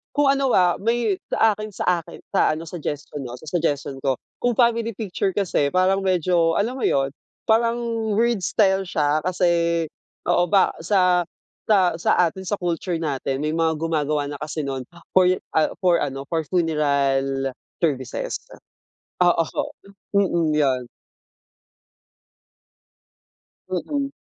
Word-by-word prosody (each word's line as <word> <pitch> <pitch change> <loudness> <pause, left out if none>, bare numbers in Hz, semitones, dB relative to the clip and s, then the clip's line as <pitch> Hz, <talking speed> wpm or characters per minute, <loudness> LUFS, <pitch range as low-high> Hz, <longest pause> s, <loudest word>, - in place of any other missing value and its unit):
kung 290 -1 +3
ano, 275 -1 +2
ah, 180 -4 +4
may 230 -1 +1 0.2
sa 220 -2 +3
akin 215 0 -7
sa 190 - -4 0.2
akin - - -12 0.2
sa - - +4
ano 160 - -6
suggestion 150 -3 -5
'no, 120 -1 -6
sa 155 - -14
suggestion 145 -4 -1
ko, 135 -2 0 0.2
kung 245 0 +3
family 230 -1 +3
picture 200 -2 -2
kasi 175 -7 0
parang 190 +1 +2
medyo 175 -2 +2
alam 230 +5 0
mo 265 - -5
yun, 135 0 +2 0.4
parang 230 +1 +3 0.4
weird 235 0 +2
style 190 +1 +2
siya 155 -4 0
kasi 170 -2 +1 0.4
oo 175 0 +2
ba 195 +2 +4
sa 180 0 +2 0.4
sa 190 -5 +4
sa - - +2 0.2
atin 190 +3 -7
sa 205 - 0
culture 175 -1 -2
natin 140 -3 -2
may 155 - 0
mga 160 0 +1
gumagawa 155 -2 0
na 145 - -7
kasi 155 +1 -4
nun 135 -2 -4 0.2
for, 185 -1 +5 0.3
ah, 155 - +4 0.2
for 175 -2 +4
ano, 135 -1 -3
for 165 -1 0
funeral 140 -5 +1 0.3
services, 130 -6 -1 0.9
oo. 170 -1 +3 0.7
Mm, 175 -6 +2
yun. 135 -4 +2 2.9
Mm. 275 - -2
170 Hz, 135 wpm, -23 LUFS, 150-195 Hz, 2.9 s, for